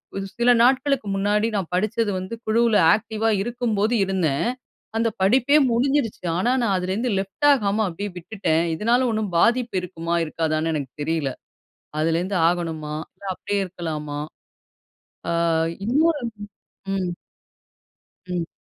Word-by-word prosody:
வ்து 195 0 -3
சில 240 +1 +5
நாட்களுக்கு 265 -1 +2
முன்னாடி 205 +2 +1
நான் 190 -4 -3
படிச்சது 215 +3 0
வந்து 185 +4 -6
குழுல 225 0 +3 0.2
ஆக்டிவா 220 0 -2
இருக்கும்போது 235 -2 0
இருந்தேன். 180 -5 0 0.5
அந்த 230 0 +2
படிப்பே 250 +9 +4
முடிஞ்சிடுச்சு. 245 -4 0
ஆனா 230 +7 +2
நான் 210 -4 +2
அதுலேருந்து 190 +7 -1
லெஃப்ட் 195 +9 -1
ஆகாம 215 -5 +2
அப்டியே 200 +4 -5
விட்டுட்டேன். 170 -3 0
இதனால 240 +7 +2
ஒண்ணும் 215 -3 -2
பாதிப்பு 235 +2 +2
இருக்குமா, 170 -2 -3
இருக்காதான்னு 160 0 -1
எனக்கு 140 -4 -3
தெரியல. 155 -3 -1 0.7
அதுலேருந்து 170 +5 0
ஆகணுமா, 160 -3 -2 0.2
இல்ல - - -17
அப்டியே 200 +2 -2
இருக்கலாமா? 155 -5 -5 1.1
ஆ - - 0 0.5
இன்னொரு 295 +4 +2 0.7
ம். 185 -2 -1 1.2
ம். 180 -2 -3
200 Hz, 120 wpm, -23 LUFS, 170-230 Hz, 1.2 s, சில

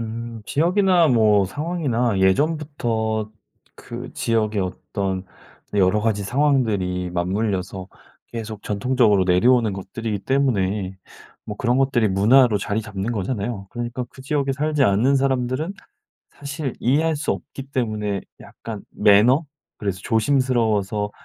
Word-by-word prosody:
음. 115 0 -6
지역이나 175 +2 +3
뭐 110 -5 +4
상황이나 125 - -1
예전부터 110 -2 0 0.4
그 - - -8
지역의 110 -3 0
어떤 95 0 -4 0.5
네 105 - +2
여러 95 +3 +3
가지 105 -2 0
상황들이 105 -8 0
맞물려서 95 +1 -2 0.4
계속 110 -3 -7
전통적으로 105 -2 +2
내려오는 110 +4 +3
것들이기 105 +2 -4
때문에 100 -8 0 0.5
뭐 105 - -6
그런 120 +2 +1
것들이 130 -5 +2
문화로 110 +4 +4
자리 105 +2 -2
잡는 105 0 -4
거잖아요. 105 -1 -3
그러니까 120 +1 -4
그 - - -14
지역에 140 0 0
살지 150 +1 0
않는 120 +8 +3
사람들은 135 +6 0 0.6
사실 145 -1 -5
이해할 155 +6 +2
수 145 - -1
없기 135 - -8
때문에 105 -5 -1 0.2
약간 - - -9
매너? 115 +9 +4 0.3
그래서 100 -4 -3
조심스러워서 110 -4 +1
115 Hz, 305 characters per minute, -22 LUFS, 100-135 Hz, 0.6 s, 뭐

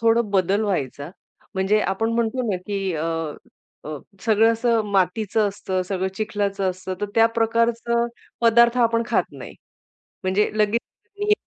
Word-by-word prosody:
थोडं 230 -1 +3
बदल 195 +2 +2
व्हायचा, 145 -5 -2 0.4
म्हणजे 195 +3 +2
आपण 225 +4 0
म्हणतो 235 +2 0
ना, 190 - 0
की 195 -2 -2
अ, 155 - -2 0.8
अ, 155 0 -5 0.2
सगळं 225 0 +4
असं 230 0 +1
मातीचं 200 +3 +2
असतं, 190 -2 -3
सगळं 190 0 -2
चिखलाचं 205 -2 -1
असतं, 185 +1 -6
तर 205 - 0
त्या 225 0 +6
प्रकारचं 230 +1 +1 0.3
पदार्थ 235 +1 +5
आपण 230 -1 +3
खात - - +2
नाही. - - -10 0.7
म्हणजे 190 +3 +2
लगेच 215 +2 +2 0.4
नाही 415 0 +3
210 Hz, 140 wpm, -23 LUFS, 190-230 Hz, 0.8 s, त्या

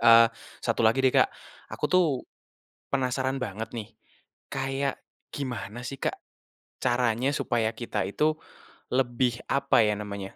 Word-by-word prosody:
Eee, 115 0 +8 0.3
satu - - +1
lagi 115 +4 +4
deh, 130 - +5
Kak, - - +5 0.4
aku - - -5
tuh, 185 -1 +4 0.9
penasaran 130 0 0
banget 110 -1 -4
nih 115 -2 -6 0.6
kayak 135 +1 -1 0.4
gimana 120 -4 -4
sih 135 - -5
Kak, - - 0 0.7
caranya 120 0 +2
supaya 115 -4 +1
kita 120 - -2
itu 155 +9 +2 0.6
lebih 125 -1 +1
apa 140 -3 +4
ya 105 - +2
namanya, 100 -2 -6
125 Hz, 130 wpm, -27 LUFS, 115-135 Hz, 0.9 s, Eee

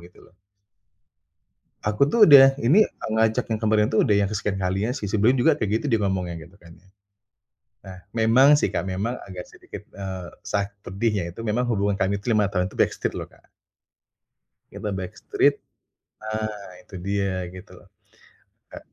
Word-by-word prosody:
Gitu 85 +1 -17
loh. - - -23 1.5
Aku 105 +7 +1
tuh 225 +8 +2
udah 135 -2 +8
ini, 180 - +5
eee, - - -9
ngajak 110 +2 +1
yang 110 - 0
kemarin 110 -1 +2
tuh 110 - +2
udah 105 - +3
yang 100 -1 +2
kesekian 105 -2 -3
kalinya 95 +6 -1
sih. 105 -7 -5
Sebelum 110 +5 +3
juga 145 +4 +2
kayak 105 +2 -1
gitu, - - -3
dia 115 - +2
ngomongnya 90 -3 -2
gitu 90 - -21
kan 85 - -16
ya. 95 - -26 1.0
Nah 95 -1 -10 0.2
memang 130 +6 +5
sih, - - -1
Kak, - - 0
memang 95 +5 -3
agak 90 -2 -9
sedikit, - - -12
eee, 95 -2 -6 0.2
sa 100 -1 -1 0.2
pedihnya 100 -2 -2
itu - - -14
memang 110 +4 0
hubungan 100 -2 0
kami 100 +1 0
itu 115 +3 -1
5 105 -2 +2
tahun 90 -2 -1
tuh - - -13
backstreet - - -1
loh, - - -6
Kak. - - -25 1.3
Kita 105 - -5
backstreet 95 -1 0 0.7
nah, 110 -2 -5
itu 105 - -14
dia 95 -1 -2
gitu 95 - -12
loh. - - -19 0.9
E - - -8
105 Hz, 170 wpm, -23 LUFS, 95-115 Hz, 1.5 s, udah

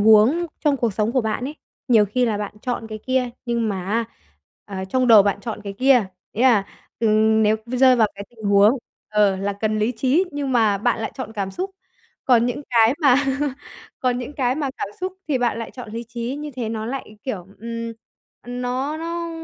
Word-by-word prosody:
huống 220 +11 +5 0.2
trong 285 -2 +3
cuộc 235 -5 0
sống 215 +3 0
của 255 - +3
bạn 220 +2 -2
ấy, 295 +4 -5 0.3
nhiều 220 -4 +6
khi 245 +5 0
là 210 -2 0
bạn 205 0 -5
chọn 245 -3 -3
cái 215 0 -6
kia 255 +1 0 0.2
nhưng 235 -2 0
mà 190 -3 -3
á 225 +3 +1 0.6
à, 190 -2 -5
trong 250 +5 +1
đầu 215 -3 +9
bạn 200 0 0
chọn 220 0 -5
cái 200 - -4
kia, 250 -1 +4 0.3
nghĩa 230 - -1
là, 225 -7 +5 0.3
ừ, 230 - +2 0.4
nếu 215 +1 +3
v 250 - -5
rơi 255 -1 +6
vào 220 -2 +4
cái 200 0 -7
tình 220 -2 -14
huống 205 +5 +5 0.3
ờ, 205 -2 +3
là 200 +1 -2
cần 215 +1 -1
lý 220 +4 +1
trí 265 +10 +2
nhưng 280 -2 -2
mà 215 -4 +3
bạn 240 +2 +1
lại 220 - -3
chọn 240 -5 -6
cảm 195 -3 -3
xúc. 375 - -4 0.5
Còn 240 -2 +4
những 260 +4 -3
cái 230 +1 +5
mà 275 -5 +6 0.9
còn 250 -1 +1
những 255 +4 -6
cái 255 -3 0
mà 285 -3 -2
cảm - - -2
xúc 370 0 -2 0.2
thì 270 -4 +1
bạn 240 -1 0
lại 230 - -5
chọn 245 -4 -9
lý 230 +1 -5
trí, 240 +3 -4
như 300 0 -6
thế 230 -3 -2
nó 220 -1 -3
lại, 240 -4 -6
kiểu, 195 -9 -4
ừm, 230 0 -4 0.5
ờ, - - -17
nó 250 +4 -2
nó 335 0 -4
235 Hz, 220 wpm, -22 LUFS, 215-260 Hz, 0.9 s, đầu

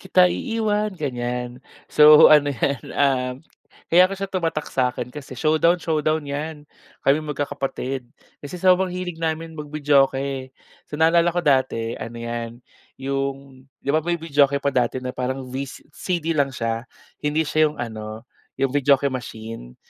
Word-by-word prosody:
kita 185 -2 +4
iiwan, 215 -1 -1
ganyan. 125 -3 -4 0.3
So 150 0 +8
ano 145 -1 +6
'yan, 140 +1 -1 0.2
ah, 130 -3 +1 0.6
kaya 180 +2 +7
ko 195 - -4
siya 195 - -3
tumatak 165 -5 -2
sa 125 -1 +2
akin 125 0 -6
kasi 135 -3 -9
showdown-showdown 155 0 +1
'yan 145 +1 -5 0.4
kami 140 +3 +4
magkakapatid. 140 -3 -4 0.3
Kasi 145 +5 -7
sobrang 185 +1 +3
hilig 180 -2 -5
namin 160 0 -2
mag-videoke. 140 -3 0 0.4
So, 150 - -6
naalala 165 +2 +4
ko 175 0 -1
dati 130 -5 +1
ano 115 +1 -7
'yan 115 +1 -6 0.3
'yong 135 0 -4 0.2
'di 140 - 0
ba 155 - +3
may 170 +2 -1
videoke 145 -3 +2
pa 140 0 -1
dati 125 0 +1
na 125 0 -4
parang 130 +1 -3
vi 135 +2 -4
CD 165 +4 -4
lang 140 -1 +3
siya 115 +1 -3 0.3
hindi 150 +2 0
siya 155 +1 +3
'yong 150 - -10
ano 110 0 -8 0.3
'yong 135 -1 0
videoke 140 -1 +3
machine. 110 - -7
140 Hz, 150 wpm, -22 LUFS, 130-160 Hz, 0.6 s, So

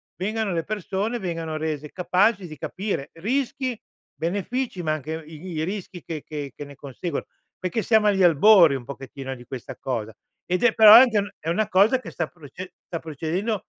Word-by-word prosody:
vengano 210 +1 -2
le 165 -1 -1
persone, 205 +4 -2
vengano 165 -4 -3
rese 155 -1 -4
capaci 185 +2 +2
di 155 -2 -10
capire 190 -1 -4
rischi, 255 +6 -1 0.4
benefici, 200 +5 -2
ma 155 -1 +1
anche 155 +2 -4
i 155 -1 -11 0.2
i - - 0
rischi 185 -1 -6
che 155 -3 -6
che 145 -4 -6
che - - -7
ne 140 0 -12
conseguo. 140 +4 -5 0.3
Perché 185 +5 -1
siamo 220 -2 +4
agli 195 -2 +3
albori 170 -1 +7
un 125 -3 -6
pochettino 135 0 -7
di 120 - -12
questa 125 -1 -7
cosa 110 -4 -4 0.3
ed 180 +3 -1
è 240 -2 +5
però 215 -1 +10
è 235 - +12
anche 210 -6 +2
è 160 - -4
una 215 +5 +1
cosa 215 +7 +4
che - - -9
sta 170 - -2
proce 175 +3 -11
sta 165 - -5
procedendo 170 +7 -3
175 Hz, 185 wpm, -24 LUFS, 155-210 Hz, 0.4 s, è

